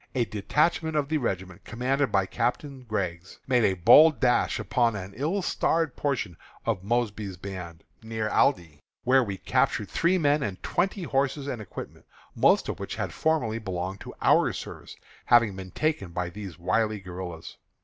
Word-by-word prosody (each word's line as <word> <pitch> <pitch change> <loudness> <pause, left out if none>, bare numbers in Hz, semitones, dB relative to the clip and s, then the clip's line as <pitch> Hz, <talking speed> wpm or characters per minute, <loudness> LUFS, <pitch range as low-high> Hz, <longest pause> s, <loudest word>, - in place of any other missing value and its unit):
A 120 -2 +2
detachment 155 - 0
of 145 -2 0
the 155 -1 +1
regiment, 95 -6 -4
commanded 130 +2 -1
by 95 -1 +2
Captain 125 +5 -3
Griggs, 90 -4 -3
made 125 -3 +3
a 95 -3 +3
bold 150 - +7
dash 125 -1 +2
upon 120 -3 +1
an 95 0 -6
ill 165 - -1
starred 165 -5 0
portion 120 - -2 0.3
of 105 -5 -1
Mosby's 105 -3 -1
band, 90 -3 -8 0.2
near 110 -1 -3
Aldie, 85 - +1 0.2
where 130 +1 +4
we 100 -4 -4
captured 100 - 0
three 175 +3 +2
men 145 -3 +2
and 100 -7 -4
twenty 190 +1 -1
horses 140 -1 0
and 125 -5 -4
equipments, 105 - -9 0.3
most - - +3
of - - -4
which - - -5
had - - -3
formerly 125 -9 0
belonged 95 -2 -4
to - - -10
our - - +4
service, - - -8 0.3
having 115 -5 +4
been 95 -1 -8
taken 155 - -1
by 90 0 -3
these 100 -3 -8
wily 105 +4 0
guerillas. 90 -3 -8
110 Hz, 165 wpm, -27 LUFS, 95-140 Hz, 0.3 s, bold